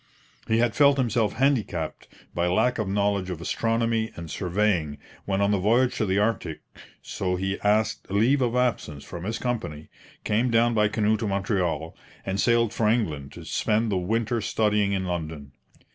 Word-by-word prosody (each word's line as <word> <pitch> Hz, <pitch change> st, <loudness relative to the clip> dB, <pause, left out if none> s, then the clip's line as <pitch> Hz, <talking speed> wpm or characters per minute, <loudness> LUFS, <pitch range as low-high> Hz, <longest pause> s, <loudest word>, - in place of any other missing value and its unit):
He 110 Hz, -, +2 dB
had 115 Hz, -1 st, +2 dB
felt 140 Hz, -1 st, +5 dB
himself 115 Hz, -4 st, +1 dB
handicapped 115 Hz, -, -1 dB, 0.3 s
by 85 Hz, 0 st, 0 dB
lack 125 Hz, +8 st, +1 dB
of 110 Hz, -, -1 dB
knowledge 100 Hz, -1 st, 0 dB
of 90 Hz, -3 st, -4 dB
astronomy 115 Hz, +4 st, 0 dB
and 85 Hz, -2 st, -8 dB
surveying 90 Hz, -5 st, 0 dB, 0.3 s
when 100 Hz, 0 st, 0 dB
on 100 Hz, 0 st, +3 dB
the 100 Hz, -, +2 dB
voyage 120 Hz, +6 st, +2 dB
to 110 Hz, -, 0 dB
the 95 Hz, +1 st, +1 dB
Arctic, 105 Hz, -7 st, -1 dB, 0.4 s
so 90 Hz, -1 st, -2 dB
he 95 Hz, +2 st, -2 dB
asked 105 Hz, +2 st, +1 dB
leave 115 Hz, +8 st, +3 dB
of 120 Hz, -1 st, +1 dB
absence 115 Hz, -, -1 dB
from 85 Hz, 0 st, -8 dB
his 110 Hz, +3 st, -2 dB
company, 80 Hz, -12 st, -4 dB, 0.3 s
came 115 Hz, +4 st, +1 dB
down 115 Hz, +1 st, +3 dB
by 105 Hz, -1 st, +3 dB
canoe 110 Hz, 0 st, +1 dB
to 110 Hz, -, -3 dB
Montreal, 90 Hz, -5 st, -1 dB, 0.3 s
and 95 Hz, 0 st, -2 dB
sailed 115 Hz, -1 st, +2 dB
for 110 Hz, -, +1 dB
England 80 Hz, -, -1 dB
to -, -, -10 dB
spend 110 Hz, +1 st, 0 dB
the 95 Hz, -, +1 dB
winter 110 Hz, +5 st, -1 dB
studying 105 Hz, -2 st, +1 dB
in 95 Hz, -1 st, -1 dB
London. 80 Hz, -5 st, -5 dB
105 Hz, 175 wpm, -25 LUFS, 90-115 Hz, 0.4 s, felt